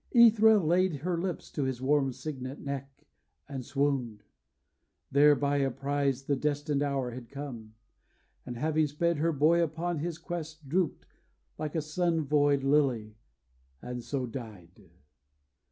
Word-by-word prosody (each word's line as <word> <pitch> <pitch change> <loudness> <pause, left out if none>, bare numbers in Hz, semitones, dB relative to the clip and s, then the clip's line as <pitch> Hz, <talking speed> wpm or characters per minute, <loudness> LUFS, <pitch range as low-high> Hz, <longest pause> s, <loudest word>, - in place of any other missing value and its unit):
Æthra 220 -2 +7
laid 180 0 +2
Her 175 +2 -1
lips 175 +1 -4
to 145 - -1
his 130 -2 -2
warm 135 0 +2
cygnet 130 0 -6
neck, 140 -1 -6 0.4
and 135 -3 -5
swooned, 130 -5 -1 0.9
Thereby 145 0 +4
apprised 135 0 0
the 140 - +1
destined 145 0 -1
hour 135 -3 -1
had 120 -1 -9
come, 125 -6 -8 0.7
And 120 - -7
having 155 +3 +1
sped 170 +3 0
her 165 +3 +1
boy 160 +3 +3
upon 165 +1 -1
his 165 +1 -3
quest, 160 -3 -7
Drooped, 170 +3 0 0.5
like 155 0 -4
a 160 - 0
sun 165 0 0
void 145 -1 +3
lily, 130 -7 +1 0.6
and 125 0 -6
so 135 -1 -2
died. 110 -8 -10
145 Hz, 135 wpm, -29 LUFS, 130-160 Hz, 0.9 s, Æthra